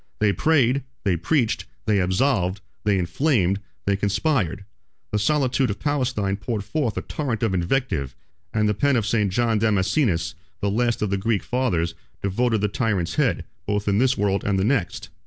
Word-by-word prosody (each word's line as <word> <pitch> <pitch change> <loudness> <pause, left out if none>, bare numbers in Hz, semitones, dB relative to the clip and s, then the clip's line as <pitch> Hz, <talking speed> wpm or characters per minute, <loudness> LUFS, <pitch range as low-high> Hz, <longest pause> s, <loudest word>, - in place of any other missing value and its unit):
They 105 -2 +2
prayed, 140 - +2 0.2
they 95 -4 +2
preached, 115 - 0 0.2
they 105 -2 +3
absolved, 95 0 +1 0.2
they 105 -2 +3
inflamed, 100 - +1 0.3
they 100 - +2
conspired; 100 - 0 0.5
the 105 - +1
solitude 130 +1 +2
of 100 - -2
Palestine 125 -9 0
poured 105 0 -3
forth 120 +1 -2
a - - -2
torrent 125 -6 -3
of 110 -4 +1
invective; 85 - -1 0.4
and 105 -1 +1
the 105 - +2
pen 140 +6 +2
of 115 -4 +1
St. 105 -3 +1
John 115 +1 +1
Damascenus, 105 - +1
22 - - -31 0.3
the 100 - +1
last 120 +2 +1
of 105 - -1
the 100 - +1
Greek 105 +1 0
fathers, 90 -11 0 0.3
devoted 110 +3 +1
the 105 - +2
tyrant's 100 -5 -1
head, - - +1 0.2
both 105 0 -1
in 100 0 +3
this 130 +1 +3
world 100 -1 +1
and 100 -1 +1
the 95 - +1
next. 115 -8 -1
105 Hz, 175 wpm, -23 LUFS, 95-125 Hz, 0.5 s, they